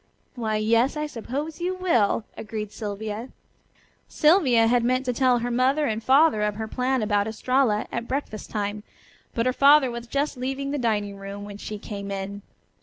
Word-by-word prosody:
"Why, 220 -3 -2
yes, 230 +6 +2
I 300 - -1
suppose 295 +5 -5
you 365 +1 -1
will," 240 - +2
agreed 215 -1 -5
Sylvia. 215 +3 -5 0.8
Sylvia 300 -8 +4
had 240 +1 +3
meant 255 +2 +1
to 250 - 0
tell 255 0 +3
her 240 +1 -2
mother 265 +5 +2
and 220 -3 -2
father 275 -2 +4
of 210 -1 0
her 220 +1 -4
plan 255 +1 0
about 205 -1 +1
Estralla 225 0 +1
at 235 0 -4
breakfast 260 -6 -4
time, 205 -1 -3 0.5
but 230 - +1
her 255 - +2
father 280 -1 +6
was 235 0 -7
just 280 +2 -1
leaving 270 +2 -3
the 290 - -2
dining 205 -4 -1
room 200 +1 -7
when 205 0 -9
she 210 - -6
came 200 -1 -7
in. 200 +1 -5
235 Hz, 180 wpm, -25 LUFS, 210-265 Hz, 0.8 s, father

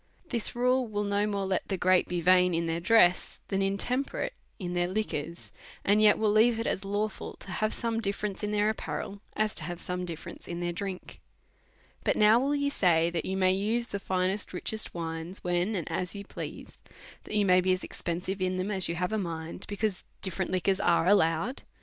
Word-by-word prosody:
This 235 -4 0
rule 250 +1 +2
will 205 -1 -2
no 205 +1 +1
more 200 -2 -1
let 190 -1 -1
the 190 - -1
great 185 0 +3
be 175 -1 -2
vain 180 0 +5
in 170 0 0
their 165 0 -1
dress, 180 -1 +4
than 195 0 0
intemperate 245 - -1 0.2
in 180 -3 -4
their 175 0 +1
liquors; 170 -5 -3 0.3
and 205 +2 +4
yet 210 -1 +6
will 215 -1 +2
leave 225 +2 +4
it 230 - -2
as 190 - -1
lawful 205 +2 -3
to 195 - -8
have 215 +3 0
some 230 -1 -1
difference 200 -1 -2
in 210 - -2
their 210 +1 +2 2.0
drink. 190 +1 -6 0.8
But - - +2
now 215 +2 +6
will 280 +3 +1
you 285 0 0
say, 170 -7 +3
that 170 -2 -2
you 190 - -2
may 185 -1 +4
use 225 +5 0
the 200 - -3
finest 190 +1 -1
richest 215 +3 -3
wines, 165 +2 -4
when 180 +4 0
and 175 -5 -3
as 180 +1 0
you 200 - -6
please, - - -8 0.5
that - - -5
you 205 - +3
may 185 -1 +5
be 185 +1 +2
as 185 0 0
expensive 180 +3 -4
in 185 0 0
them 185 +3 -2
as 190 -4 +3
you 170 - -1
have 180 +3 -1
a 220 - +1
mind, 165 -3 -5
because 205 -2 -2 0.2
different 190 -1 0
liquors 185 +1 +1
are 170 -1 +3
allowed 190 +5 +2
195 Hz, 185 wpm, -29 LUFS, 180-210 Hz, 2.0 s, yet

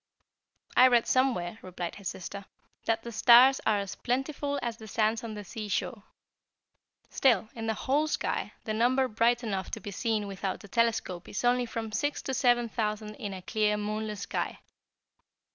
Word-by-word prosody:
"I 255 - +8
read 240 -2 +4
somewhere," 225 -7 +1
replied 180 -2 -5
his 200 -3 -4
sister, 195 +2 -7 0.4
"that 225 0 0
the 235 - -6
stars 245 +4 +7
are 215 -1 +4
as 200 -1 -3
plentiful 280 +3 -2
as 235 -1 -3
the 220 - -11
sands 220 +2 +1
on 220 -2 -5
the 210 - -6
seashore. 210 +2 -3 1.1
Still, 225 -6 +3
in 225 -1 -5
the 220 - 0
whole 290 +7 +1
sky, - - -2
the 215 - -3
number 255 +4 +3
bright 235 +1 +2
enough 195 -4 -3
to - - -5
be 205 0 -7
seen 215 +1 -1
without 195 -1 -4
a - - -10
telescope 225 -6 0
is 205 - -3
only 245 0 +3
from 225 -1 -4
six 290 +7 -1
to 265 - -3
seven 240 -2 +3
thousand 215 -1 -3
in 205 - -5
a 185 -1 -7
clear, 210 0 +1
moonless 210 0 -3
sky. - - -3
220 Hz, 175 wpm, -29 LUFS, 205-245 Hz, 1.1 s, I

